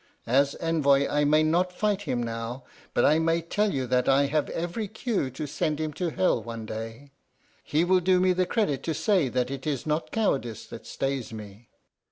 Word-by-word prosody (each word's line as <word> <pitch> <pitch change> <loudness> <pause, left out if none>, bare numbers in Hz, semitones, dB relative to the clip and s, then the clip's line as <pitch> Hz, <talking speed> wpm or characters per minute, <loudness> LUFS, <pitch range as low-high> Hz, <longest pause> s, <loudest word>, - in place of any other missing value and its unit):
As 140 +4 +2
envoy 140 -4 +2
I 145 0 +1
may 155 +2 +4
not 175 +4 +2
fight 205 +2 0
him 120 -1 0
now, 115 +2 -5 0.3
but - - +4
I 155 +2 +5
may 165 +1 +2
tell 205 +5 0
you 135 -2 -1
that 125 0 +1
I 135 +1 +4
have 150 +1 0
every 175 +6 -3
cue 215 - -2
to 130 +4 -5
send 150 +1 -2
him 155 -1 -2
to 170 +3 -2
hell 170 -6 +1
one 115 0 -7
day. 115 +6 -7 0.5
He 155 +3 +1
will 185 +1 +4
do 185 +1 +3
me 185 0 +3
the 180 0 +1
credit 175 - 0
to 160 - -1
say 165 -2 +2
that 125 +1 -1
it 135 +1 -5
is 140 -4 -2
not 155 +1 -1
cowardice 135 - -1
that - - -10
stays 135 -4 -3
me." 105 +1 -10
150 Hz, 205 wpm, -27 LUFS, 130-175 Hz, 0.5 s, I